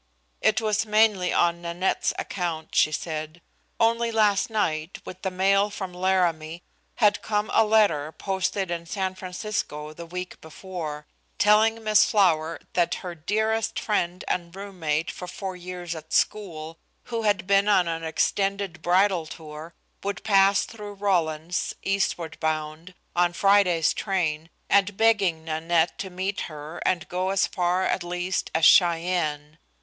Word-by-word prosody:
It - - +3
was 215 -1 +1
mainly 210 -4 +3
on 170 0 +2
Nanette's 175 +2 0
account, 170 -4 -4
she 155 - +4
said. 155 +1 -4 0.4
Only 230 0 +2
last 210 -2 +2
night, 165 -6 -1
with 185 0 -9
the 190 - -1
mail 195 +2 +2
from 190 -3 -6
Laramie, 175 -3 0 0.3
had 210 -3 +3
come 210 0 -1
a 225 - +5
letter 205 -9 +2
posted 190 0 -2
in 170 -1 -4
San 190 +1 -2
Francisco 180 -5 -4
the 170 +2 -9
week 180 +1 -7
before, 160 -2 -7 0.3
telling 220 +2 +4
Miss 215 -1 +5
Flower 165 -7 +2
that 175 -2 +1
her 180 - -4
dearest 220 +6 -1
friend 180 -4 -1
and 170 -1 -2
roommate 175 -5 -2
for 180 - -8
four 190 +1 -6
years 180 -1 -6
at 160 -1 -9
school, 165 -6 -1 0.2
who 230 -1 -3
had 205 -3 +1
been 200 +1 +3
on 185 -4 +4
an 165 0 -3
extended 195 +2 -1
bridal 180 -1 +2
tour, 155 +1 -10 0.3
would 200 0 -4
pass 195 -1 +4
through 210 -2 -9
Rawlins, 175 -4 -1
eastward 190 -4 -1
bound, 155 +2 -3 0.2
on 175 0 +2
Friday's 185 -4 +3
train, 165 -5 -2 0.2
and 200 0 +2
begging 200 -8 +2
Nanette 165 +1 0
to 190 - -4
meet 190 +2 -3
her 150 +1 -8
and 180 -3 0
go 185 +1 -2
as 195 0 +2
far 180 +1 0
at - - 0
least 180 +1 -2
as 160 -1 +4
Cheyenne. 165 -4 +3
180 Hz, 145 wpm, -25 LUFS, 165-200 Hz, 0.4 s, a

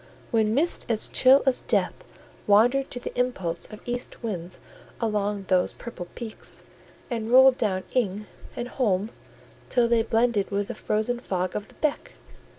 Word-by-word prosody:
—when 220 -2 +2
mists 330 +5 +1
as 220 -2 0
chill 265 +2 +6
as 265 -2 +2
death - - +1 0.5
wandered 245 +7 +4
to 245 - -5
the - - -7
impulse 190 -10 -1
of 215 - -9
east 245 0 -5
winds 180 -5 -4 0.4
along 210 -3 -1
those 185 -1 +2
purple 190 -7 -8
peaks, 230 -3 -5 0.5
and 225 -2 -2
rolled 260 0 +8
down 190 -4 0
"ing" 210 -4 0 0.3
and 240 - -4
holm 215 -4 0 0.6
till 245 -2 +3
they 235 -1 +3
blended 225 -2 +1
with 200 0 -2
the - - -2
frozen 220 +3 -1
fog 185 -6 -2
of 210 0 -4
the - - -19
beck! 305 -2 -2
225 Hz, 155 wpm, -26 LUFS, 200-245 Hz, 0.6 s, rolled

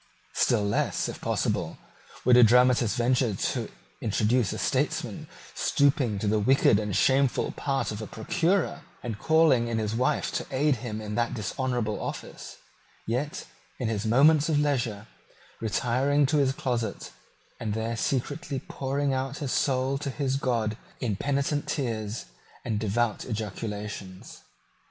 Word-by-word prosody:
Still 115 -4 +2
less, 100 0 0
if - - -7
possible, - - -1 0.5
would 125 0 +6
a 125 - +8
dramatist 120 0 +5
venture 120 -2 +2
to - - -2 0.3
introduce 110 0 +1
a - - -4
statesman - - -1 0.3
stooping 135 -6 +2
to 105 - -2
the 105 +1 +2
wicked 105 -2 +4
and 105 -3 -2
shameful 135 -1 +2
part 135 -3 -2
of 105 +1 -5
a 110 - -5
procurer, 175 +2 0 0.2
and 110 -4 -4
calling 160 -7 +4
in 115 -1 -1
his 110 -1 -1
wife 130 +6 0
to - - -3
aid 140 0 +2
him 110 -2 -5
in 105 -1 -5
that 120 +3 0
dishonourable 120 0 -2
office, - - -7 0.5
yet, 130 +6 -2 0.3
in 120 -4 -2
his 105 -2 -1
moments 145 +7 +5
of 155 - +2
leisure, 125 -8 0 0.5
retiring 130 +6 +1
to 150 +3 +1
his 135 -2 +3
closet, 120 -7 -3 0.5
and 110 -3 -2
there 115 +1 -2
secretly 140 +5 -2
pouring 140 +1 -2
out 135 +1 -2
his 140 -4 -3
soul 135 0 +1
to 140 - -3
his 135 0 -1
God 115 -5 0 0.2
in 110 -5 -1
penitent 140 +5 -1
tears 115 -5 -3 0.4
and 110 -3 -1
devout 110 +1 0
ejaculations. 105 -3 -6
125 Hz, 145 wpm, -27 LUFS, 110-140 Hz, 0.5 s, a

